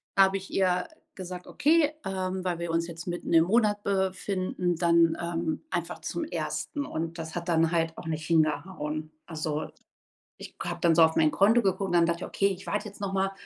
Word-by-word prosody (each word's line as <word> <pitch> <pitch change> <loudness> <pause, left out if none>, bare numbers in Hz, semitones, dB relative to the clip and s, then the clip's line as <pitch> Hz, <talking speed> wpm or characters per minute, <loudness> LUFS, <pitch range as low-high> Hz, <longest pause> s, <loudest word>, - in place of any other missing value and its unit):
da 195 - +7
habe 195 0 +2
ich 190 - -10
ihr 180 - +1 0.3
gesagt: 180 -1 -7
„Okay, 305 0 +3
ähm, 185 -1 -2
weil 180 -2 -1
wir 170 -1 -3
uns 165 +1 0
jetzt 165 0 -8
mitten 175 0 -4
im 165 -1 +7
Monat 210 0 +2
befinden, 190 -2 -1
dann, 170 -1 +4
ähm, 170 -2 -2
einfach - - -3
zum 340 - -3
1.“ 295 -2 -3
Und 165 +1 -4
das 160 -1 -6
hat 175 0 -4
dann 165 -1 +3
halt 165 -1 0
auch 170 - -8
nicht 160 0 -3
hingehauen. 155 -1 0 0.2
Also, 155 -1 -3 0.7
ich - - -9
habe 175 0 -4
dann 170 -1 +4
so 165 - +6
auf 160 0 +4
mein 155 -1 +4
Konto 220 +5 +4
geguckt 190 0 +1
und - - -3
dann 170 -1 +5
dachte 170 +1 -1
ich: - - -4
„Okay, 195 - 0
ich 190 -2 -6
warte 205 +1 -2
jetzt 200 - -14
noch 195 -1 -3
mal 195 0 +1
175 Hz, 210 wpm, -28 LUFS, 165-195 Hz, 0.7 s, da